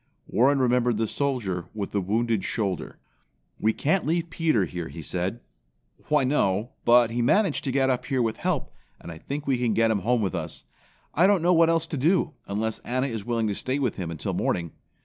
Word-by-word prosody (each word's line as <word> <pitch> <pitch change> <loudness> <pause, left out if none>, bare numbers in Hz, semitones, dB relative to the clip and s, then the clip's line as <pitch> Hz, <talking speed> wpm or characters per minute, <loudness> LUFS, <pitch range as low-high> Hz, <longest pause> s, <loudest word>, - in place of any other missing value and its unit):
Warren 135 +5 +3
remembered 125 -3 +2
the 110 0 0
soldier 105 -11 -2
with 100 -2 -4
the 100 - 0
wounded 110 +2 0
shoulder. 100 -6 -3 0.6
"We 110 - +3
can't 155 - 0
leave 165 +1 -1
Peter 155 - +2
here," 90 -2 -5
he 80 -1 -9
said. 90 +8 -3 0.7
"Why 150 -2 +3
no, 115 -5 +1
but 120 -1 +5
he 120 +1 -1
managed 190 - +2
to 135 - 0
get 135 0 +2
up 125 -1 -2
here 130 -3 +1
with 110 -1 -1
help, - - -2 0.3
and 85 - -9
I 80 - -9
think 145 - -5
we 135 -3 +1
can 120 -3 +1
get 115 0 +3
him 105 - +1
home 115 +3 +1
with 95 - -1
us. 85 -3 -5 0.5
I 175 +5 +4
don't 195 -4 +3
know 180 +1 +4
what 165 -1 +5
else 165 -1 +2
to 160 - -5
do, 165 +3 +2
unless 110 +2 -2
Anna 130 +2 -1
is 115 -6 -4
willing 115 -2 0
to - - -1
stay 130 +6 -2
with 130 -6 -1
him 90 -3 -4
until 80 -4 -4
morning." 85 -2 -1
120 Hz, 210 wpm, -26 LUFS, 100-140 Hz, 0.7 s, but